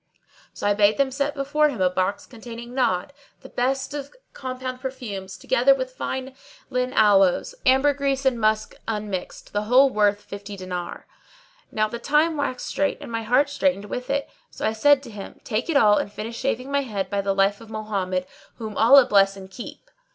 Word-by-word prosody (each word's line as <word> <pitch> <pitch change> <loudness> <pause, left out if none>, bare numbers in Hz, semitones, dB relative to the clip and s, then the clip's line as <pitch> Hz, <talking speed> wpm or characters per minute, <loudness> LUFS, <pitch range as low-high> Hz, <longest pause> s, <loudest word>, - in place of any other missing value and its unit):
So - - -7
I 205 - +4
bade 205 +1 +3
them 275 -1 +2
set 280 +2 -1
before 295 +2 +2
him 250 -8 -6
a 185 - +4
box 185 +2 -1
containing 235 0 -10
Nadd,[FN#619] 215 -8 +1 0.3
the - - -12
best 265 +2 -1
of 285 - -6 0.2
compound 255 -1 -5
perfumes, 210 -8 -6
together - - +3
with - - -4
fine 265 - -4 0.4
lign 250 0 0
aloes, 205 - +4
ambergris 275 0 +2
and 245 -3 +2
musk 215 0 +1
unmixed, 210 -4 -5
the 205 0 -1
whole 260 +4 +5
worth 205 -2 +2
fifty 200 0 -8
dinars. 180 -2 -5 0.7
Now 215 0 +1
the 235 +2 -6
time 300 +5 +2
waxed 285 -4 -2
strait 290 - -1
and - - -9
my 230 0 -2
heart 250 +6 +3
straitened 280 -7 0
with 250 +4 -5
it; 280 0 0 0.2
so - - -5
I 220 - +1
said 280 +5 +4
to 240 - -10
him, 205 -2 -9
"Take 230 +5 -2
it 310 - +3
all 210 -5 +5
and 200 - -4
finish 220 +3 -6
shaving 260 0 -2
my 280 0 +2
head 210 -7 -4
by 200 0 0
the 195 0 -1
life 200 +2 +2
of 225 - -13
Mohammed 195 -4 -2 0.3
(whom 220 -3 -7
Allah 255 +4 +7
bless 195 -4 +3
and 190 0 -11
keep!)." 245 - -10
235 Hz, 190 wpm, -24 LUFS, 205-275 Hz, 0.7 s, Allah